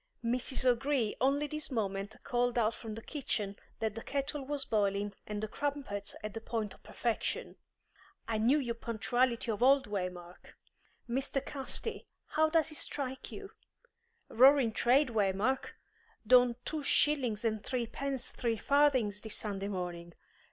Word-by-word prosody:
Mrs. 255 +2 +1
O'Gree 250 -2 +2
only 280 +3 +3
this 305 +1 -4
moment 205 -4 -2
called 245 0 0
out 225 -1 +3
from 220 -2 -7
the 225 - -8
kitchen 210 -9 -3 0.2
that 220 -2 -1
the 225 - -6
kettle 280 +2 -2
was 280 0 -1
boiling 200 -1 0
and 210 0 -4
the - - -1
crumpets 275 -7 -3
at 215 -1 -4
the 225 - -5
point 225 -3 -3
of - - -19
perfection! 235 -2 -2 0.7
I 225 -1 0
knew 245 +7 +4
your 245 -5 -1
punctuality 235 +1 0
of 215 - -4
old, 270 +2 +5
Waymark. 180 -3 -6 0.5
Mr. 265 +2 -1
Casti, 295 +10 -3 0.2
how 315 0 +3
does 320 -1 +2
it 305 - -2
strike 265 -3 -3
you? 400 0 -8 0.8
Roaring 260 0 +6
trade, 255 +5 +3
Waymark! 215 +4 0 0.5
Done 245 +1 +6
two 310 -1 -2
shillings 260 -6 +2
and 215 -2 0
threepence 255 +2 -2
three 230 -2 -1
farthings 255 -6 +3
this 220 - -3
Sunday 200 -2 -3
morning. 175 -3 -5
240 Hz, 145 wpm, -32 LUFS, 210-275 Hz, 0.8 s, Roaring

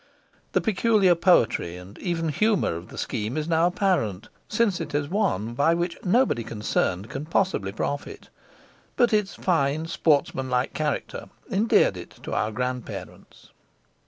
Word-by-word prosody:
The - - +3
peculiar 210 -3 +3
poetry 165 - +2
and 90 +3 -12
even 165 -3 -1
humour 210 - +1
of 85 +2 -8
the - - -12
scheme 110 +5 -3
is 155 0 -2
now 165 0 +3
apparent, 175 - 0 0.2
since 210 -5 +1
it 150 -3 -5
is 145 -1 0
one 165 - 0
by 145 +7 +3
which 170 0 -2
nobody 190 - +2
concerned 105 -3 -1
can 135 +6 -6
possibly 165 - 0
profit; 140 +7 -4 0.7
but 240 -2 +3
its 210 -2 +1
fine, 155 -3 +1
sportsmanlike 135 -5 +1
character 150 -2 -3 0.2
endeared 210 +4 +3
it - - -8
to - - -5
our 110 - 0
grandparents. 125 +2 -6
155 Hz, 140 wpm, -25 LUFS, 120-190 Hz, 0.7 s, The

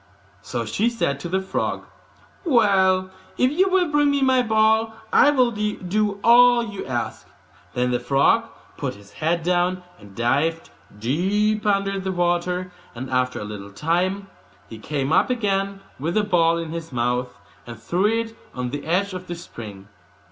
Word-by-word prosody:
So 120 -2 -4
she 205 - +1
said 140 -12 -1
to 170 - -6
the 190 +2 0
frog, 190 - -2 0.6
'Well, 190 - +3 0.3
if 255 +1 +3
you 375 +6 +2
will 370 -1 +3
bring 290 -1 +3
me 280 -1 +1
my 260 -1 +4
ball, 220 0 +2 0.2
I 295 - +6
will 255 -4 +3
do 210 -1 -1
all 240 0 +6
you 205 -4 -6
ask.' 120 -2 -4 0.5
Then 125 0 +1
the 125 - +1
frog 135 +3 +3 0.3
put - - -3
his 100 0 -16
head 165 +2 -1
down, 180 +1 +1 0.2
and 100 -1 -15
dived 145 +8 0 0.3
deep 200 - 0
under 195 -1 +1
the 190 0 -3
water; 180 +1 -1 0.2
and 130 +2 -6
after 125 0 0
a - - -5
little 105 -1 -7
while 180 - -1 0.4
he 110 - -10
came 140 +4 -2
up - - +3
again, 200 -4 -1 0.2
with 165 +5 -2
the 215 - +3
ball 170 -4 +3
in 165 -1 -5
his 165 -1 -6
mouth, 125 -3 -2 0.3
and 120 -2 -9
threw 175 - +1
it 225 +1 -1 0.2
on 125 -1 -3
the 145 +1 -5
edge 190 +4 +1
of 185 0 -7
the 175 - -4
spring. 105 - -10
180 Hz, 170 wpm, -23 LUFS, 135-215 Hz, 0.6 s, I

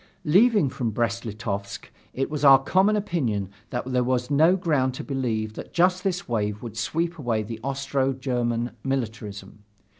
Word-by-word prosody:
Leaving 200 - +5
for 130 0 -6
Brest 115 +1 -1
Litovsk, 100 -2 -5 0.2
it 135 +3 -2
was 150 -1 -3
our 135 -1 +9
common 190 +10 +2
opinion 125 - -1 0.2
that 120 -1 -3
there 125 -1 +1
was 125 +1 -1
no 160 +6 +5
ground 145 -8 0
to - - -6
believe 115 -6 -2
that - - -9
just 180 +1 +3
this 185 -2 -2
wave 105 -2 -2
would 115 -3 -7
sweep 165 +9 -2
away 115 -5 0
the 110 +1 -7
Austro 135 0 -1
German 120 -3 -1
militarism. 105 -6 -4
130 Hz, 160 wpm, -25 LUFS, 115-150 Hz, 0.2 s, our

